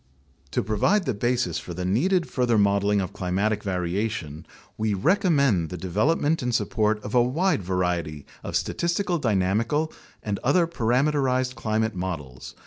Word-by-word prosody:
To -, -, -1 dB
provide 180 Hz, -, +1 dB
the 130 Hz, -, 0 dB
basis 115 Hz, -6 st, 0 dB
for 85 Hz, -, -8 dB
the 90 Hz, +1 st, -3 dB
needed 170 Hz, -, +1 dB
further 120 Hz, -3 st, +1 dB
modeling 100 Hz, 0 st, +3 dB
of 95 Hz, -, -5 dB
climatic 100 Hz, +4 st, -1 dB
variation, 90 Hz, -3 st, -3 dB, 0.3 s
we 110 Hz, -1 st, 0 dB
recommend 140 Hz, -, +2 dB
the 90 Hz, -, -5 dB
development 145 Hz, -, +1 dB
and 125 Hz, -2 st, -1 dB
support 110 Hz, -2 st, +1 dB
of 105 Hz, -, -6 dB
a 125 Hz, -, +5 dB
wide 150 Hz, -, +1 dB
variety 90 Hz, -5 st, -2 dB, 0.2 s
of -, -, -5 dB
statistical 175 Hz, 0 st, 0 dB
dynamical 115 Hz, +7 st, 0 dB, 0.3 s
and 105 Hz, -2 st, -2 dB
other 170 Hz, +7 st, +3 dB
parameterized 130 Hz, -2 st, +1 dB
climate 110 Hz, -2 st, -1 dB
models. 80 Hz, -9 st, -6 dB
110 Hz, 140 wpm, -25 LUFS, 95-135 Hz, 0.3 s, a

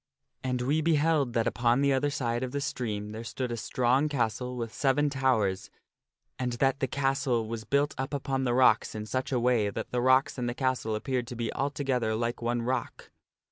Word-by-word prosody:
And 125 Hz, -1 st, -1 dB
we 145 Hz, +5 st, +1 dB
beheld 155 Hz, -4 st, +2 dB
that 115 Hz, -1 st, +1 dB
upon 120 Hz, +2 st, +2 dB
the 140 Hz, -1 st, +3 dB
other 135 Hz, +2 st, +1 dB
side 120 Hz, -5 st, -1 dB
of 130 Hz, 0 st, -4 dB
the 140 Hz, -, -1 dB
stream 105 Hz, -6 st, -3 dB
there 110 Hz, +1 st, -6 dB
stood 125 Hz, +2 st, -4 dB
a -, -, -1 dB
strong 130 Hz, +5 st, +1 dB
castle 125 Hz, -1 st, -1 dB
with 115 Hz, -2 st, -4 dB
seven 145 Hz, +1 st, +2 dB
towers, 110 Hz, -9 st, +1 dB, 0.7 s
and 125 Hz, -1 st, -1 dB
that 135 Hz, +3 st, +1 dB
the 135 Hz, -, 0 dB
castle 135 Hz, -3 st, 0 dB
was 110 Hz, -1 st, -5 dB
built 140 Hz, +1 st, +1 dB
up 135 Hz, +1 st, -2 dB
upon 135 Hz, -2 st, -1 dB
the 120 Hz, -2 st, +1 dB
rocks 125 Hz, -4 st, +4 dB
in 105 Hz, 0 st, -4 dB
such 130 Hz, +5 st, -2 dB
a 125 Hz, -, +2 dB
way 120 Hz, -4 st, +2 dB
that -, -, -5 dB
the 125 Hz, -, 0 dB
rocks 130 Hz, +1 st, +3 dB
and 120 Hz, -1 st, -1 dB
the 120 Hz, -, -4 dB
castle 130 Hz, -5 st, 0 dB
appeared 125 Hz, +2 st, -2 dB
to 125 Hz, -, -6 dB
be 115 Hz, -1 st, -3 dB
altogether 135 Hz, -5 st, -1 dB
like 120 Hz, +2 st, -2 dB
one 120 Hz, 0 st, -1 dB
rock. 125 Hz, 0 st, -3 dB
125 Hz, 205 wpm, -29 LUFS, 115-135 Hz, 0.7 s, rocks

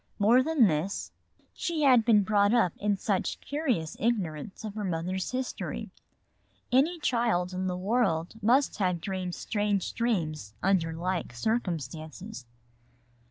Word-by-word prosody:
More 225 Hz, +5 st, +5 dB
than 295 Hz, -3 st, +4 dB
this, 170 Hz, +2 st, -1 dB, 0.4 s
she 325 Hz, -3 st, -2 dB
had 255 Hz, -5 st, +6 dB
been 215 Hz, -3 st, +5 dB
brought 205 Hz, +2 st, +3 dB
up 185 Hz, -8 st, +3 dB
in 205 Hz, -1 st, 0 dB
such 190 Hz, -1 st, -1 dB
curious 260 Hz, -, -2 dB
ignorance 190 Hz, -7 st, -2 dB
of 215 Hz, -2 st, -5 dB
her 210 Hz, 0 st, -4 dB
mother's 185 Hz, +1 st, -2 dB
history. 255 Hz, 0 st, -4 dB, 0.8 s
Any 290 Hz, +8 st, +3 dB
child 230 Hz, -, +1 dB
in 185 Hz, +1 st, -2 dB
the 180 Hz, -1 st, -2 dB
world 190 Hz, -5 st, 0 dB
must 250 Hz, +7 st, +3 dB
have 180 Hz, -3 st, +1 dB
dreamed 185 Hz, -1 st, -4 dB
strange 205 Hz, -3 st, -1 dB
dreams 155 Hz, -, -2 dB
under 185 Hz, -4 st, +2 dB
like 175 Hz, -3 st, -3 dB
circumstances. 155 Hz, -, -3 dB
200 Hz, 130 wpm, -28 LUFS, 175-235 Hz, 0.8 s, had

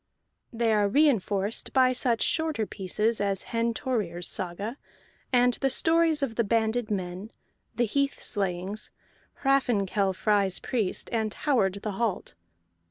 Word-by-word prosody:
They 230 Hz, -1 st, +1 dB
are 205 Hz, -1 st, +3 dB
reinforced 215 Hz, -6 st, +1 dB
by 255 Hz, -1 st, +4 dB
such 245 Hz, -2 st, +2 dB
shorter 315 Hz, -9 st, 0 dB
pieces 210 Hz, +3 st, -1 dB
as 195 Hz, -2 st, 0 dB
Hen 230 Hz, 0 st, +1 dB
Thorir's 185 Hz, -10 st, -2 dB
Saga, 200 Hz, +7 st, -3 dB, 0.5 s
and 245 Hz, -1 st, +4 dB
the 270 Hz, +2 st, +1 dB
Stories 325 Hz, +1 st, +3 dB
of 255 Hz, -5 st, -1 dB
the 235 Hz, -, +3 dB
Banded 225 Hz, +1 st, 0 dB
Men, 190 Hz, +1 st, -4 dB, 0.4 s
the 240 Hz, -, +2 dB
Heath 280 Hz, +5 st, -1 dB
Slayings, 195 Hz, 0 st, -1 dB, 0.5 s
Hraffnkell 210 Hz, -8 st, +1 dB
Frey's 200 Hz, -2 st, +1 dB
Priest, 220 Hz, -7 st, -2 dB
and 220 Hz, -2 st, 0 dB
Howard 200 Hz, -8 st, 0 dB
the 215 Hz, -, -2 dB
Halt. 205 Hz, -1 st, -2 dB
220 Hz, 130 wpm, -27 LUFS, 195-250 Hz, 0.5 s, by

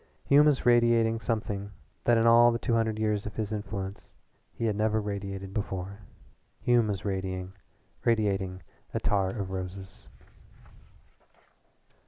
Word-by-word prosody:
Hume 145 Hz, +2 st, +6 dB
was 145 Hz, -3 st, +2 dB
radiating 120 Hz, -2 st, +4 dB
something 105 Hz, -3 st, -3 dB, 0.4 s
that 120 Hz, -1 st, +5 dB
in 115 Hz, -, +3 dB
all 120 Hz, +1 st, +7 dB
the 115 Hz, -, -1 dB
two 115 Hz, +1 st, -1 dB
hundred 110 Hz, -1 st, +1 dB
years 105 Hz, -1 st, 0 dB
of 105 Hz, -, -8 dB
his 110 Hz, -1 st, -3 dB
influence 100 Hz, -2 st, -5 dB, 0.4 s
he 115 Hz, -, -4 dB
had 110 Hz, -2 st, +1 dB
never 110 Hz, +1 st, +1 dB
radiated 100 Hz, -2 st, -5 dB
before. 100 Hz, -1 st, -4 dB, 0.6 s
Hume 120 Hz, -2 st, +3 dB
was 100 Hz, -1 st, -3 dB
radiating 95 Hz, +1 st, -3 dB, 0.3 s
attar 100 Hz, -2 st, +1 dB
of 95 Hz, -2 st, -4 dB
roses. 95 Hz, +1 st, -7 dB
105 Hz, 125 wpm, -28 LUFS, 95-115 Hz, 0.6 s, all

